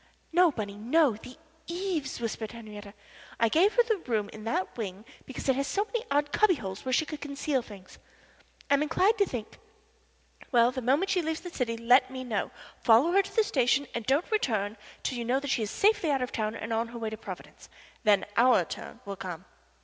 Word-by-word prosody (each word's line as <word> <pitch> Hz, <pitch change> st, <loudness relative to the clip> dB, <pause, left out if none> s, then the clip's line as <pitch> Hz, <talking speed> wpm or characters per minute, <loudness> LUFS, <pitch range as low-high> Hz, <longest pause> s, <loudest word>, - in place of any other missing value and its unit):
"No, 355 Hz, 0 st, +6 dB
Bunny, 205 Hz, -6 st, -5 dB
no 265 Hz, +4 st, +3 dB
the 250 Hz, +4 st, -12 dB, 0.3 s
eaves," 340 Hz, -7 st, -3 dB
whispered 225 Hz, -1 st, -4 dB
Henriette. 210 Hz, -3 st, -10 dB, 0.4 s
"I 230 Hz, -, +4 dB
gave 365 Hz, -, +3 dB
her 485 Hz, -, +6 dB
that 440 Hz, -, -2 dB
room 215 Hz, -4 st, 0 dB
in 215 Hz, 0 st, -10 dB
the 345 Hz, +11 st, 0 dB
wing 205 Hz, -2 st, -5 dB, 0.2 s
because 265 Hz, -, -6 dB
it 265 Hz, -, +4 dB
has 275 Hz, +1 st, -1 dB
so 405 Hz, +1 st, 0 dB
many 470 Hz, +1 st, -3 dB
odd 290 Hz, +1 st, +1 dB
cubby 425 Hz, -4 st, +4 dB
holes 195 Hz, -7 st, -6 dB
where 260 Hz, -, -3 dB
she 285 Hz, +5 st, +3 dB
could 305 Hz, -1 st, -7 dB
conceal 280 Hz, -1 st, -1 dB
things. 195 Hz, -5 st, -13 dB, 0.7 s
I -, -, +2 dB
am 280 Hz, -, +4 dB
inclined 375 Hz, +8 st, +2 dB
to 400 Hz, -, +4 dB
think 225 Hz, -4 st, -6 dB, 0.9 s
well, 240 Hz, -1 st, +5 dB
the 260 Hz, 0 st, -4 dB
moment 280 Hz, +11 st, +2 dB
she 365 Hz, -, +2 dB
leaves 320 Hz, 0 st, -3 dB
the 355 Hz, -, -8 dB
city 230 Hz, -7 st, -2 dB
let 245 Hz, +3 st, +4 dB
me 260 Hz, 0 st, -6 dB
know. 225 Hz, -5 st, -2 dB, 0.3 s
Follow 245 Hz, +8 st, +5 dB
her 395 Hz, +2 st, +5 dB
to -, -, -11 dB
the 445 Hz, -, +5 dB
station, 275 Hz, -, +2 dB
and 235 Hz, -, -3 dB
don't 285 Hz, -, +1 dB
return 215 Hz, -, 0 dB, 0.3 s
till 250 Hz, -, -2 dB
you -, -, -2 dB
know 250 Hz, +3 st, +1 dB
she 270 Hz, -4 st, 0 dB
is 210 Hz, -, -2 dB
safely 405 Hz, -, +2 dB
out 270 Hz, -3 st, +1 dB
of 250 Hz, -, -4 dB
town 215 Hz, 0 st, -2 dB
and 225 Hz, +1 st, -4 dB
on 225 Hz, +1 st, 0 dB
her 235 Hz, +1 st, -9 dB
way 225 Hz, -2 st, -3 dB
to 220 Hz, -, -5 dB
Providence. -, -, -10 dB, 0.3 s
Then 205 Hz, -3 st, +4 dB
our 235 Hz, -7 st, +5 dB
turn -, -, -8 dB
will 200 Hz, -1 st, -6 dB
come." 180 Hz, -2 st, -6 dB
255 Hz, 215 wpm, -29 LUFS, 220-315 Hz, 0.9 s, No